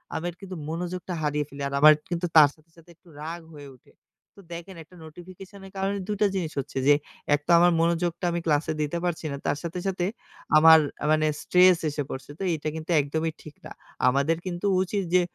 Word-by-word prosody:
আমের 170 +1 -3
কিন্তু 190 -2 -8
মনোযোগটা 180 +2 -4
হারিয়ে 150 0 -1
ফেলি। 140 0 -10
আর 140 - -7
আমার 155 +1 +9 0.2
কিন্তু 175 0 -2
তার 150 -3 +8
সাথে, 155 +1 -28
সাথে 165 +1 -19
একটু 175 - -29
রাগ 165 +2 -5 0.2
হয়ে 145 -1 -11
উঠে। - - -26 0.4
তো - - -13
দেখেন 175 +3 -8
একটা 170 +4 -20
নোটিফিকেশন 185 +5 -12
এর 190 - -15
কারণে 195 +1 -1
২ 210 - -2
টা 205 - +5
জিনিস 170 -5 -2
হচ্ছে 135 0 -6
যে, 145 - +8 0.4
একতো 150 +3 -9
আমার 175 0 +5
মনোযোগটা 170 +1 0
আমি 170 - -1
ক্লাসে 155 0 +1
দিতে 150 +3 -2
পারছি 170 -2 -3
না 140 - -4
তার - - 0
সাথে, 170 +1 -4
সাথে 185 -2 -1 0.5
আমার 160 +1 +8 0.2
আ - - -1
মানে 155 0 +3 0.2
স্ট্রেস 180 -1 +5
এসে 145 0 -3
পড়ছে। 135 +1 -7
তো - - -4
এইটা 155 -1 -4
কিন্তু 160 +2 -5
একদমই 160 +3 -2
ঠিক 155 - -12
না। - - -10 0.4
আমাদের 140 +5 +2
কিন্তু 180 +1 -4 0.2
উচিত 195 +2 -2
যে 180 - +6
165 Hz, 205 wpm, -25 LUFS, 150-180 Hz, 0.5 s, আমার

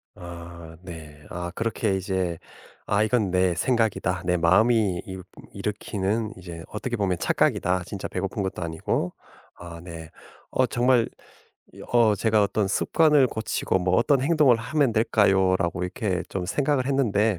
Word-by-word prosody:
아 85 -1 -10
네. 80 -4 -10
아 85 0 -5
그렇게 110 -3 -1
이제 95 -3 -2 0.5
'아 100 +1 +2
이건 110 -3 +1
내 90 -1 +2
생각이다. 100 -5 0
내 90 0 +2
마음이 100 +2 +3
이 95 -1 -7 0.3
일으키는 105 +1 -2
이제 85 -2 -9
어떻게 120 +3 -4
보면 95 -4 0
착각이다. 90 0 +1
진짜 95 +1 -5
배고픈 95 +2 -3
것도 95 -1 -4
아니고.' 85 +1 -2 0.5
아 85 -1 -9
네. 85 -2 -9 0.4
어 130 - +2
정말 120 0 +2 0.7
이 - - -14
어 115 -3 +5
제가 110 +1 +2
'어떤 100 0 0
습관을 150 +5 +3
고치고 110 -4 -1
뭐 90 0 +1
어떤 130 +3 +3
행동을 150 -5 +4
하면 125 +2 0
될까요?'라고 95 -5 +2
이렇게 90 0 -2
좀 90 -2 -4
생각을 135 +4 0
했는데 110 -7 +1
100 Hz, 295 characters per minute, -25 LUFS, 90-115 Hz, 0.7 s, 어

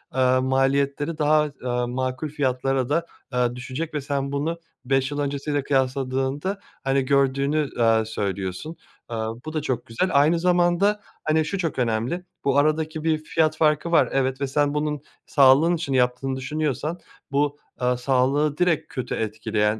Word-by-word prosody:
ııı, 130 0 +3
maliyetleri 140 +4 +1
daha, 150 0 +4 0.2
ııı, 125 -1 -1
makul 130 +4 -2
fiyatlara 135 -2 0
da, 165 +3 +1 0.3
ııı, 125 -1 +1
düşecek 130 +6 -5
ve 150 - -2
sen 140 0 -2
bunu 155 +4 -2 0.3
5 135 +1 +1
yıl 145 - -3
öncesiyle 145 0 -1
kıyaslandığında, 135 +6 -1 0.2
hani, 135 0 +1
gördüğünü, 140 +2 +2
ııı, 115 -2 +3
söylüyorsun. 100 - -4 0.4
Iıı, 110 -1 -2
bu 155 - -5
da 155 - -1
çok 125 -5 -2
güzel 115 +12 -1
aynı 150 +4 +4
zamanda, 180 +4 +3 0.2
hani, 155 0 +2
şu 175 +6 -2
çok 165 -7 -2
önemli. 120 +9 -1 0.2
Bu 140 0 +2
aradaki 155 +1 +1
bir 160 -1 +2
fiyat 155 0 +1
farkı 155 +1 +2
var, 170 - +4
evet 135 0 0
ve 140 - 0
sen 145 +1 +1
bunun 150 -1 -1 0.2
sağlığın 140 +5 +5
için 155 -4 -3
yaptığını 125 +1 +1
düşünüyorsan 150 +3 -2 0.3
bu, 145 +1 +1 0.2
ııı, 125 0 +2
sağlığı 135 +4 +1
direkt 175 -3 +1
kötü 130 -4 -3
etkileyen 105 0 -1
140 Hz, 155 wpm, -24 LUFS, 130-155 Hz, 0.4 s, sağlığın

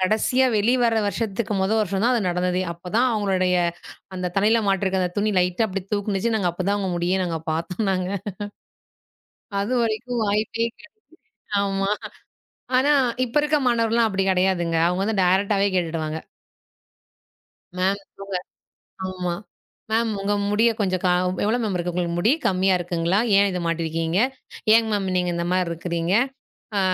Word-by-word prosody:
கடைசியா 220 +7 +2
வெளிவர 235 +2 +3
வருஷத்துக்கு 220 +1 -2
மொத 190 - +1
வருஷம் 195 0 -1
தான் 250 - +4
அது 230 - +1
நடந்தது. 180 +1 0
அப்பத் 175 +3 -10
தான் 255 +2 +4
அவங்களுடைய 190 -4 +1 0.6
அந்தத் 180 -1 -4
தலையில 220 +3 +4
மாட்டுற 190 -1 +1 0.2
துணி 210 +1 +1
லைட்டா 180 +5 +1
அப்டி 190 0 -3
தூக்குனுச்சு. 205 +2 0
நாங்க 185 -5 +1
அப்பத் 185 +2 -3
தான் 205 - +2
அவுங்க 190 -2 -2
முடியை 180 +2 +1
நாங்க 165 -2 -2
பாத்தோன்னாங்க 180 +3 -1 1.5
அதுவரைக்கும் 235 +1 -1
வாய்ப்பே 215 +3 0
கிடை. 315 - -17 0.7
ஆமா. 195 0 -1 0.9
ஆனா 285 +3 +3 0.3
இப்ப 235 - -10
இருக்க 300 0 +2
மாணவர்கள் 230 -1 +1
எல்லாம் 230 -2 +3
அப்டி 195 0 0
கிடையாதுங்க. 180 -3 +1
அவுங்க 180 +2 -1
வந்து 210 -2 0
டைரக்ட்டாவே 195 +2 +2
கேட்டுட்டு 165 -2 -1
வாங்க. 155 +1 -4 1.6
மேம் 190 +2 +1
சொல்லுங்க. 195 -2 -5 0.7
ஆமா 180 -2 -3 0.6
மேம் 225 0 +2
உங்க 205 +1 0 0.2
முடிய 220 +3 +4
கொஞ்சம் 185 -3 0
கா 180 - +3 0.3
எவ்ளோ 220 +4 +2
மேம் 205 -4 -1
இருக்கு 175 0 -1
உங்களுக்கு 170 -1 -1
முடி? 220 +8 +3
கம்மியா 190 0 +3
இருக்குங்களா? 175 +2 0 0.2
ஏன் 200 - +5
இத 180 - -2
மாட்டி 165 0 -1
இருக்கீங்க? 165 +2 -1 0.6
ஏங் 225 -1 +3
மேம் 200 -2 0
நீங்க 180 -1 +1
இந்த 170 0 -2
மாதிரி 185 -2 +1
இருக்கிறீங்க? 170 +1 -2 0.6
அ - - +3
195 Hz, 150 wpm, -23 LUFS, 180-215 Hz, 1.6 s, ஏன்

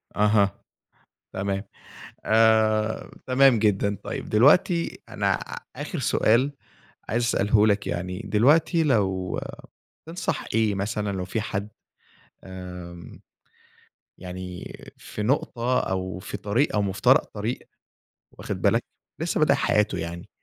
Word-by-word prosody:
أها، 105 -1 +3 0.8
تمام. 100 +1 -2 0.6
آآ، 110 0 +3 0.2
تمام 130 -1 +5
جدًا. 100 -1 +1
طيب، - - -5
دلوقتي 160 - +3
أنا - - 0 0.4
آخر - - -5
سؤال 125 +6 +2 0.6
عايز 120 +3 +1
أسأله 105 -2 +3
لك 100 -2 +1
يعني، 90 +1 -3
دلوقتي 150 - +3
لو 95 - 0 0.7
تنصح 170 +2 -3
إيه 110 -2 +2
مثلًا 105 +1 -2
لو 95 -1 -3
في 105 +4 -3
حد 105 -1 -4 0.7
آمم، 90 -2 -9 1.0
يعني 90 0 -7 0.2
في 105 - -7
نقطة 125 0 0
أو 95 -1 -3
في 90 - -6
طريق 115 +8 0
أو 105 - +2
مفترق 100 +7 +3
طريق 110 +3 -2 0.8
واخد - - -5
بالك، - - +3 0.4
لسه - - -1
بادئ - - +5
حياته 105 0 +1
يعني، 85 +1 -6
105 Hz, 110 wpm, -25 LUFS, 95-115 Hz, 1.0 s, تمام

